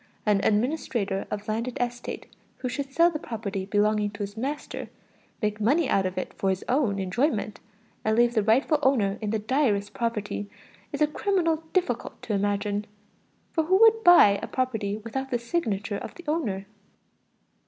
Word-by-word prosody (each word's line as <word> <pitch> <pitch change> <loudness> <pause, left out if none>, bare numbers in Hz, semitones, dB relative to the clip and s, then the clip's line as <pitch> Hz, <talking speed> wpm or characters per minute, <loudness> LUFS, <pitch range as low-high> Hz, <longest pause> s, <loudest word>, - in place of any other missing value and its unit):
An 205 -2 +3
administrator 215 -4 0
of 210 +1 -5
landed 230 +3 -2
estate 245 0 -3 0.3
who 255 - -3
should 275 +2 -4
sell 335 +4 +4
the 305 - -4
property 205 -6 -4
belonging 210 0 +2
to 205 0 -6
his 200 +1 -6
master, 275 +6 -4 0.5
make 210 0 -1
money 280 +8 +3
out 195 -5 +2
of 185 - -7
it 185 - -3
for 195 - -1
his 190 0 -2
own 245 -7 +1
enjoyment, 210 - -1 0.4
and 220 +1 +1
leave 240 0 +4
the 220 - +3
rightful 255 +8 +3
owner 220 -7 +2
in 215 - -2
the 220 - +1
direst 215 -3 0
poverty, 210 -3 -3 0.4
is - - +1
a - - +4
criminal 335 0 +1
difficult 300 -11 -1
to 220 - -3
imagine. 205 +1 -1 0.6
For 320 -2 0
who 375 +4 +4
would 450 0 +6
buy 275 - +7
a - - -4
property 220 -6 -1
without 250 +5 -5
the 245 - +1
signature 225 - -2
of - - -8
the 350 - -11
owner? 225 - -1
225 Hz, 170 wpm, -26 LUFS, 205-275 Hz, 0.6 s, buy